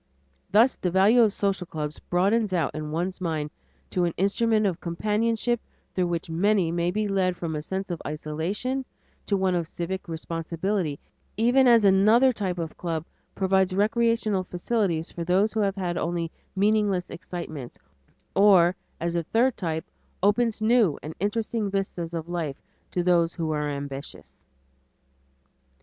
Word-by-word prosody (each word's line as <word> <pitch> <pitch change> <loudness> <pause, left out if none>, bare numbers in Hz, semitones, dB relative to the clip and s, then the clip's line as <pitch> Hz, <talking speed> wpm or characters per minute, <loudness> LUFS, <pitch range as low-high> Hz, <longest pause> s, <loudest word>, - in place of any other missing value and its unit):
Thus 225 +6 +5
the 180 - -1
value 200 +7 +5
of 220 -3 +5
social 195 -3 -1
clubs 150 -2 -5
broadens 200 +3 +1
out 165 -5 0
in 155 0 -5
one's 175 +4 -3
mind 155 -4 -2 0.4
to 180 - +1
an 170 - -2
instrument 215 +3 +2
of 180 -3 -1
companionship 220 +6 0 0.3
through 180 -1 +1
which 170 -1 -2
many 180 +1 +2
may 170 0 0
be 210 +3 -1
led 185 -3 +1
from 165 -2 -3
a 150 - -2
sense 190 +4 -4
of 170 - -4
isolation 165 - -3 0.4
to 200 - +2
one 190 -1 +1
of 170 -2 -1
civic 185 +4 -4
responsibility, 165 0 -2 0.4
even 245 +4 +4
as 230 -3 +6
another 215 +7 +5
type 190 -5 -2
of 165 -2 -4
club 165 -2 -3 0.3
provides 190 -1 +2
recreational 220 -1 +2
facilities 180 -2 -1
for 170 - -5
those 190 +5 +2
who 220 - -1
have 200 -2 +1
had 175 -3 -2
only 170 -1 -2 0.2
meaningless 200 -2 +1
excitements, 155 -8 -7 0.6
or, 190 -3 +6 0.2
as 170 +1 -2
a 170 - +2
third 230 +9 +2
type, 160 -4 -3 0.4
opens 215 +1 +2
new 220 - +4
and 155 - -6
interesting 215 +2 -1
vistas 185 -4 -3
of 165 0 -4
life 165 -5 -3 0.3
to 180 - -1
those 175 -1 +3
who 160 -2 -2
are 150 -1 -1
ambitious. 140 0 -6
185 Hz, 155 wpm, -26 LUFS, 165-210 Hz, 0.6 s, as